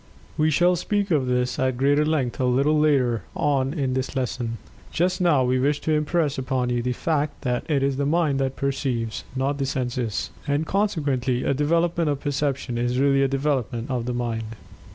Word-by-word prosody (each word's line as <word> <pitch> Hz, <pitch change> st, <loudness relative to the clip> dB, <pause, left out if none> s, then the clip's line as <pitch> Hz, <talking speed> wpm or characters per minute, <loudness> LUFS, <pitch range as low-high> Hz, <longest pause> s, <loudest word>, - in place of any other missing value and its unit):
We 155 Hz, +1 st, +2 dB
shall 175 Hz, +4 st, +3 dB
speak 205 Hz, +2 st, -1 dB
of 140 Hz, -5 st, +2 dB
this 125 Hz, -1 st, 0 dB
at 130 Hz, -1 st, 0 dB
greater 145 Hz, +3 st, +3 dB
length 150 Hz, -6 st, -1 dB
a 130 Hz, -, +2 dB
little 140 Hz, +5 st, +3 dB
later 130 Hz, -7 st, +2 dB
on 135 Hz, -2 st, +1 dB
in 140 Hz, -5 st, -1 dB
this 130 Hz, +1 st, -2 dB
lesson. 120 Hz, -3 st, -2 dB, 0.3 s
Just 180 Hz, +2 st, 0 dB
now 155 Hz, -7 st, +4 dB
we 125 Hz, +1 st, +1 dB
wish 145 Hz, +3 st, +1 dB
to 160 Hz, -, -1 dB
impress 150 Hz, -1 st, +1 dB
upon 130 Hz, -1 st, -1 dB
you 120 Hz, -1 st, 0 dB
the 125 Hz, +1 st, -1 dB
fact 150 Hz, +1 st, -2 dB
that 125 Hz, +2 st, -2 dB
it 140 Hz, -3 st, +2 dB
is 135 Hz, -1 st, 0 dB
the 140 Hz, -, 0 dB
Mind 155 Hz, -3 st, +1 dB
that 135 Hz, -1 st, -1 dB
perceives, 130 Hz, -5 st, -2 dB
not 140 Hz, +2 st, -1 dB
the 135 Hz, -, 0 dB
senses. 125 Hz, -4 st, -2 dB, 0.2 s
And, 145 Hz, +2 st, +1 dB
consequently, 145 Hz, -11 st, 0 dB
a -, -, +1 dB
development 165 Hz, +3 st, +1 dB
of 145 Hz, -2 st, -1 dB
Perception 140 Hz, -4 st, -2 dB
is 120 Hz, +1 st, 0 dB
really 135 Hz, 0 st, +3 dB
a 135 Hz, -, +3 dB
development 135 Hz, -3 st, -1 dB
of 125 Hz, -2 st, -2 dB
the 125 Hz, -, -1 dB
Mind. 115 Hz, -2 st, -3 dB
135 Hz, 195 wpm, -24 LUFS, 125-150 Hz, 0.3 s, now